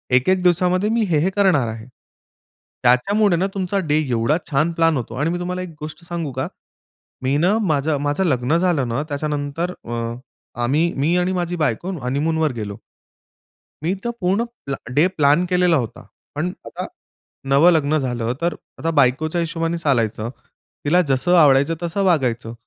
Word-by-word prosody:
एक 130 Hz, +7 st, +3 dB
एक 185 Hz, -1 st, +3 dB
दिवसामध्ये 180 Hz, +3 st, +3 dB
मी 230 Hz, +1 st, +1 dB
हे-हे 160 Hz, +2 st, +2 dB
करणार 185 Hz, -, +3 dB
आहे. 110 Hz, 0 st, -6 dB, 1.0 s
त्याच्यामुळे 190 Hz, -, +3 dB
ना 190 Hz, +3 st, +1 dB
तुमचा 195 Hz, 0 st, -1 dB
डे 150 Hz, 0 st, +3 dB
एवढा 120 Hz, +6 st, +2 dB
छान 150 Hz, +4 st, +2 dB
प्लान 165 Hz, -2 st, +2 dB
होतो 120 Hz, -2 st, -5 dB
आणि 150 Hz, +5 st, 0 dB
मी 175 Hz, +1 st, -2 dB
तुम्हाला 180 Hz, +1 st, -3 dB
एक 185 Hz, -, -6 dB
गोष्ट 155 Hz, +3 st, -8 dB
सांगू 170 Hz, -4 st, -4 dB
का, 130 Hz, +1 st, -3 dB, 0.8 s
मी 130 Hz, +2 st, +1 dB
ना 180 Hz, +7 st, +3 dB
माझं, 155 Hz, -7 st, +1 dB
माझं 145 Hz, +6 st, 0 dB
लग्न 130 Hz, -2 st, +1 dB
झालं 170 Hz, -7 st, +1 dB
ना, 120 Hz, +5 st, -1 dB
त्याच्यानंतर 145 Hz, +3 st, -2 dB
अ, 120 Hz, -, -7 dB, 0.7 s
आम्ही 155 Hz, +8 st, +2 dB
मी 155 Hz, +6 st, +1 dB
आणि 180 Hz, +1 st, +1 dB
माझी 175 Hz, -1 st, -2 dB
बायको 155 Hz, -, -1 dB
हनीमूनवर 155 Hz, +4 st, 0 dB
गेलो. 105 Hz, -4 st, -6 dB, 1.1 s
मी 170 Hz, +4 st, +1 dB
तर 235 Hz, -, -1 dB
पूर्ण 190 Hz, +5 st, +2 dB, 0.2 s
प्लॅ 140 Hz, -, -2 dB, 0.2 s
डे 150 Hz, +7 st, +4 dB
प्लॅन 150 Hz, +4 st, +4 dB
केलेला 180 Hz, -2 st, +3 dB
होता. 120 Hz, -3 st, -4 dB, 0.3 s
पण 165 Hz, +5 st, -1 dB
आता -, -, -6 dB, 0.6 s
नवं 145 Hz, +6 st, +6 dB
लग्न 155 Hz, -2 st, +2 dB
झालं 120 Hz, -4 st, -2 dB
तर 170 Hz, +1 st, +1 dB, 0.3 s
आता 165 Hz, -, -1 dB
बायकोच्या 155 Hz, +6 st, +2 dB
हिशोबाने 165 Hz, 0 st, -2 dB
चालायचं, 115 Hz, -8 st, 0 dB, 0.6 s
तिला 175 Hz, +5 st, +4 dB
जसं 135 Hz, +7 st, +3 dB
आवडायचं 145 Hz, 0 st, +5 dB
तसं 170 Hz, +4 st, -1 dB
वागायचं. 125 Hz, -10 st, +1 dB
155 Hz, 160 wpm, -21 LUFS, 135-175 Hz, 1.1 s, नवं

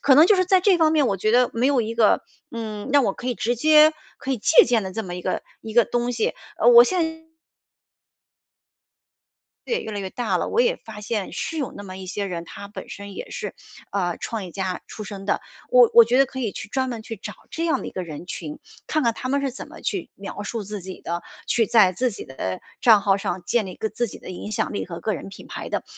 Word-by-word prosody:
可 270 Hz, -1 st, +6 dB
能 310 Hz, -, +8 dB
就 415 Hz, -, +6 dB
是 370 Hz, -1 st, +3 dB
在 370 Hz, 0 st, +4 dB
这 375 Hz, -2 st, +4 dB
方 315 Hz, -1 st, +4 dB
面 300 Hz, -4 st, +3 dB
我 195 Hz, -, 0 dB
觉 215 Hz, +3 st, +1 dB
得 245 Hz, +1 st, +4 dB
没 245 Hz, +4 st, +2 dB
有 275 Hz, -4 st, +3 dB
一 225 Hz, +1 st, -3 dB
个， 225 Hz, -3 st, +4 dB, 0.3 s
嗯， 220 Hz, -3 st, -5 dB
让 285 Hz, -3 st, +5 dB
我 200 Hz, -, +1 dB
可 250 Hz, -, -6 dB
以 245 Hz, -, -1 dB
直 240 Hz, +2 st, 0 dB
接 310 Hz, +4 st, +6 dB, 0.3 s
可 270 Hz, -, -2 dB
以 255 Hz, -, -2 dB
借 300 Hz, +9 st, +6 dB
鉴 235 Hz, -3 st, +2 dB
的 190 Hz, -1 st, -5 dB
这 220 Hz, 0 st, -3 dB
么 175 Hz, -, -6 dB
一 180 Hz, -, -6 dB
个 -, -, -2 dB, 0.2 s
一 220 Hz, -, -7 dB
个 240 Hz, -2 st, +6 dB
东 240 Hz, 0 st, -1 dB
西， 230 Hz, -2 st, 0 dB, 0.2 s
呃， 230 Hz, -, +1 dB
我 240 Hz, 0 st, +10 dB
现 320 Hz, +1 st, -1 dB, 2.4 s
对， 470 Hz, -, 0 dB
越 220 Hz, -, -6 dB
来 205 Hz, -, -3 dB
越 190 Hz, -1 st, -5 dB
大 245 Hz, -, -1 dB
了， -, -, -2 dB
我 475 Hz, -, +2 dB
也 -, -, +3 dB
发 215 Hz, -2 st, -11 dB
现 210 Hz, -1 st, -3 dB
是 325 Hz, -, -3 dB
有 280 Hz, -5 st, -2 dB
那 205 Hz, -, -8 dB
么 185 Hz, -1 st, -8 dB
一 190 Hz, -, -8 dB
些 200 Hz, +2 st, -3 dB
人， 170 Hz, -3 st, -4 dB
他 200 Hz, +4 st, -9 dB
本 205 Hz, -, -9 dB
身 200 Hz, -1 st, -8 dB
也 -, -, -7 dB
是， -, -, -5 dB, 0.4 s
呃， 175 Hz, -4 st, 0 dB
创 220 Hz, -4 st, -4 dB
业 180 Hz, -, -8 dB
家 190 Hz, 0 st, -3 dB
出 215 Hz, -, -7 dB
身 195 Hz, -1 st, -8 dB
的， 205 Hz, -, 0 dB, 0.3 s
我 -, -, +7 dB
我 470 Hz, -1 st, +10 dB
觉 255 Hz, -, +2 dB
得 275 Hz, -, +6 dB
可 260 Hz, 0 st, -7 dB
以 225 Hz, -, -1 dB
去 200 Hz, -, -7 dB
专 260 Hz, +3 st, -1 dB
门 235 Hz, -3 st, -4 dB
去 225 Hz, 0 st, -7 dB
找 195 Hz, -, -7 dB, 0.2 s
这 330 Hz, -, -3 dB
样 330 Hz, -, +1 dB
的 -, -, -6 dB
一 -, -, -5 dB
个 185 Hz, -, -3 dB
人 165 Hz, 0 st, -8 dB
群， 155 Hz, -4 st, -6 dB, 0.3 s
看 310 Hz, -4 st, +1 dB
看 230 Hz, -, +2 dB
他 255 Hz, -, -5 dB
们 280 Hz, +1 st, +1 dB
是 275 Hz, -2 st, -2 dB
怎 265 Hz, -, -9 dB
么 -, -, -12 dB
去 385 Hz, -4 st, -3 dB
描 200 Hz, +1 st, -7 dB
述 220 Hz, +1 st, -4 dB
自 205 Hz, -1 st, -6 dB
己 185 Hz, 0 st, -8 dB
的， 170 Hz, +1 st, -4 dB, 0.2 s
去 230 Hz, -, +3 dB
在 215 Hz, -6 st, +5 dB
自 250 Hz, +6 st, 0 dB
己 200 Hz, -, -8 dB
的 95 Hz, -8 st, -4 dB, 0.2 s
账 220 Hz, -4 st, +7 dB
号 195 Hz, -1 st, +3 dB
上 195 Hz, -3 st, -3 dB
建 235 Hz, +2 st, +1 dB
立 185 Hz, -, -6 dB
一 -, -, -10 dB
个 220 Hz, -, -2 dB
自 240 Hz, +1 st, -2 dB
己 -, -, -10 dB
的 -, -, -9 dB
影 185 Hz, +3 st, -6 dB
响 215 Hz, -, -1 dB
力 -, -, -2 dB
和 170 Hz, -2 st, -7 dB
个 215 Hz, -, -1 dB
人 175 Hz, -, -7 dB
品 195 Hz, -, -11 dB
牌 -, -, -6 dB
的， -, -, -2 dB
225 Hz, 280 characters per minute, -23 LUFS, 195-270 Hz, 2.4 s, 我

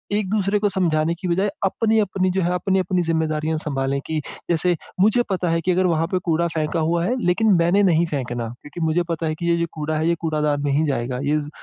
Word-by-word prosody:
एक-दूसरे 205 Hz, 0 st, +1 dB
को 205 Hz, -, +1 dB
समझाने 165 Hz, -4 st, +1 dB
की 185 Hz, -, -4 dB
बजाय 190 Hz, +4 st, +1 dB, 0.2 s
अपनी-अपनी 200 Hz, -3 st, +1 dB
जो 190 Hz, -, 0 dB
है, 175 Hz, 0 st, +1 dB
अपनी-अपनी 185 Hz, 0 st, 0 dB
ज़िम्मेदारियाँ 160 Hz, -1 st, 0 dB
सँभालें 140 Hz, -3 st, -2 dB
कि 160 Hz, -1 st, -1 dB, 0.3 s
जैसे 175 Hz, +1 st, +2 dB, 0.3 s
मुझे 220 Hz, +4 st, +4 dB
पता 180 Hz, -2 st, 0 dB
है 165 Hz, 0 st, +1 dB
कि 180 Hz, -, +1 dB
अगर 185 Hz, +1 st, +2 dB
वहाँ 165 Hz, -1 st, +1 dB
पे 185 Hz, 0 st, -1 dB
कूड़ा 170 Hz, +1 st, +2 dB
फेंका 155 Hz, +2 st, -1 dB
हुआ 170 Hz, +2 st, +1 dB
है, 250 Hz, -, 0 dB
लेकिन 200 Hz, +4 st, +3 dB
मैंने 175 Hz, +4 st, +3 dB
नहीं 170 Hz, -2 st, +3 dB
फेंकना 125 Hz, -5 st, -3 dB
क्योंकि 145 Hz, +7 st, -10 dB
मुझे 160 Hz, +2 st, +1 dB
पता 165 Hz, -1 st, -2 dB
है 155 Hz, -, -1 dB
कि 170 Hz, -, -5 dB
ये 170 Hz, -, +4 dB
जो 170 Hz, -, 0 dB
कूड़ा 155 Hz, 0 st, -3 dB
है, 160 Hz, +2 st, 0 dB
ये 170 Hz, -, +2 dB
कूड़ादान 150 Hz, -3 st, 0 dB
में 145 Hz, -, 0 dB
ही 155 Hz, +3 st, +2 dB
जाएगा। 125 Hz, -2 st, -2 dB
इज़ 150 Hz, -1 st, -1 dB
170 Hz, 220 wpm, -22 LUFS, 155-185 Hz, 0.3 s, मुझे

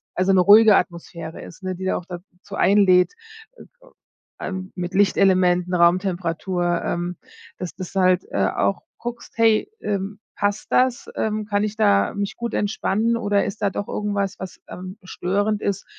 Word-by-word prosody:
also, 185 Hz, +1 st, +2 dB
'ne 185 Hz, -, +5 dB
ruhige 210 Hz, +2 st, +7 dB
Atmosphäre 170 Hz, -2 st, -5 dB
ist, 175 Hz, -, -12 dB
ne, 185 Hz, 0 st, -3 dB
die 190 Hz, +1 st, -6 dB
da 190 Hz, -, +1 dB
auch 175 Hz, -, -8 dB
dazu 180 Hz, +2 st, -10 dB
einlädt, 190 Hz, -3 st, +4 dB, 0.4 s
äh, -, -, -12 dB, 0.8 s
ähm, 185 Hz, 0 st, -5 dB
mit 175 Hz, -1 st, -4 dB
Lichtelementen, 185 Hz, -2 st, +3 dB
Raumtemperatur, 175 Hz, 0 st, +1 dB
ähm, 175 Hz, 0 st, -3 dB, 0.4 s
dass 180 Hz, -2 st, -6 dB
das 185 Hz, 0 st, -7 dB
halt, 185 Hz, -1 st, +3 dB
äh, -, -, +1 dB
auch -, -, 0 dB, 0.2 s
guckst: 240 Hz, 0 st, -7 dB
„Hey, 225 Hz, -, +3 dB
ähm, 200 Hz, 0 st, -3 dB, 0.2 s
passt 205 Hz, 0 st, -1 dB
das? 255 Hz, -1 st, +2 dB
Ähm, 215 Hz, -1 st, -1 dB
kann 205 Hz, 0 st, 0 dB
ich 215 Hz, +1 st, -3 dB
da 100 Hz, -, +3 dB
mich 200 Hz, -1 st, -3 dB
gut 235 Hz, -1 st, -5 dB
entspannen 215 Hz, +2 st, 0 dB
oder 205 Hz, -3 st, +1 dB
ist 205 Hz, +1 st, -6 dB
da 200 Hz, -, +2 dB
doch 205 Hz, -, -4 dB
irgendwas, 205 Hz, -2 st, -2 dB
was, 190 Hz, -1 st, -8 dB
ähm, 185 Hz, +2 st, -8 dB
störend 205 Hz, +3 st, -1 dB
ist?“ 200 Hz, -1 st, -2 dB
190 Hz, 160 wpm, -22 LUFS, 180-205 Hz, 0.8 s, ruhige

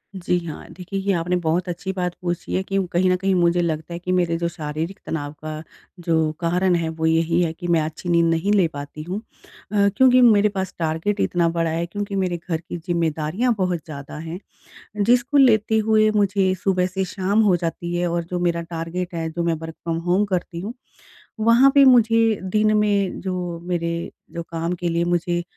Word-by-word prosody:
जी 180 Hz, -1 st, 0 dB
हाँ, 155 Hz, -, -7 dB
देखिए 185 Hz, +2 st, -5 dB
ये 195 Hz, +1 st, 0 dB
आपने 180 Hz, +1 st, 0 dB
बहुत 175 Hz, +3 st, 0 dB
अच्छी 175 Hz, +2 st, -4 dB
बात 180 Hz, -2 st, -2 dB
पूछी 175 Hz, -1 st, -3 dB
है 185 Hz, -, +1 dB
कि 195 Hz, +1 st, -2 dB
कहीं 185 Hz, +2 st, +2 dB
न -, -, +3 dB
कहीं 195 Hz, +1 st, 0 dB
मुझे 175 Hz, 0 st, +3 dB
लगता 160 Hz, 0 st, -3 dB
है 170 Hz, -, -5 dB
कि 180 Hz, +1 st, -4 dB
मेरे 175 Hz, -2 st, +1 dB
जो 170 Hz, 0 st, -1 dB
शारीरिक 160 Hz, +4 st, -5 dB
तनाव 145 Hz, -2 st, -3 dB
का 155 Hz, 0 st, -5 dB, 0.4 s
जो 160 Hz, -2 st, +1 dB
कारण 180 Hz, +2 st, +1 dB
है 165 Hz, -1 st, -1 dB
वो 160 Hz, 0 st, -3 dB
यही 165 Hz, +2 st, +2 dB
है 165 Hz, -, +1 dB
कि 175 Hz, +2 st, -7 dB
मैं 170 Hz, -2 st, +3 dB
अच्छी 160 Hz, +3 st, -5 dB
नींद 170 Hz, -1 st, +4 dB
नहीं 170 Hz, +5 st, 0 dB
ले 185 Hz, -5 st, +4 dB
पाती 145 Hz, +2 st, -7 dB
हूँ। 185 Hz, +5 st, -4 dB, 0.5 s
अ, 200 Hz, -1 st, +3 dB
क्योंकि 255 Hz, -1 st, +6 dB
मेरे 210 Hz, -3 st, +5 dB
पास 190 Hz, -2 st, -4 dB
टारगेट 165 Hz, +6 st, -1 dB
इतना 170 Hz, -1 st, +1 dB
बड़ा 165 Hz, -1 st, 0 dB
है 165 Hz, +1 st, -1 dB
क्योंकि 200 Hz, +3 st, -5 dB
मेरे 185 Hz, -3 st, 0 dB
घर 165 Hz, -, 0 dB
की 175 Hz, +2 st, -7 dB
ज़िम्मेदारियाँ 170 Hz, +6 st, 0 dB
बहुत 180 Hz, -3 st, 0 dB
ज़्यादा 145 Hz, -2 st, -8 dB
हैं 165 Hz, +3 st, -6 dB, 0.7 s
जिस 240 Hz, +2 st, +4 dB
को 285 Hz, +3 st, -2 dB
लेते 220 Hz, -4 st, +4 dB
हुए 215 Hz, 0 st, +4 dB
मुझे 195 Hz, -2 st, +2 dB
सुबह 185 Hz, -2 st, +2 dB
से 190 Hz, +1 st, -2 dB
शाम 195 Hz, +3 st, 0 dB
हो 185 Hz, -4 st, +4 dB
जाती 170 Hz, +1 st, -4 dB
है। 175 Hz, 0 st, 0 dB
और 170 Hz, 0 st, -1 dB
जो 180 Hz, +1 st, -4 dB
मेरा 170 Hz, -1 st, 0 dB
टारगेट 170 Hz, +2 st, -5 dB
है, 165 Hz, -1 st, -2 dB
जो 170 Hz, +1 st, -3 dB
मैं 170 Hz, -1 st, +1 dB
वर्क 160 Hz, 0 st, -7 dB
फ़्रॉम 165 Hz, -1 st, -4 dB
होम 195 Hz, +3 st, +3 dB
करती 170 Hz, -1 st, -3 dB
हूँ, 220 Hz, +6 st, -5 dB, 0.7 s
वहाँ 230 Hz, +5 st, +6 dB
पे 280 Hz, -1 st, +7 dB
मुझे 225 Hz, -3 st, +5 dB
दिन 215 Hz, +3 st, +2 dB
में 205 Hz, -2 st, +1 dB
जो 180 Hz, -2 st, -3 dB
मेरे 170 Hz, -1 st, -2 dB, 0.2 s
जो 170 Hz, -, -4 dB
काम 165 Hz, +1 st, -3 dB
के 175 Hz, 0 st, -3 dB
लिए 170 Hz, 0 st, 0 dB
मुझे 175 Hz, 0 st, 0 dB
175 Hz, 205 wpm, -22 LUFS, 165-195 Hz, 0.7 s, पे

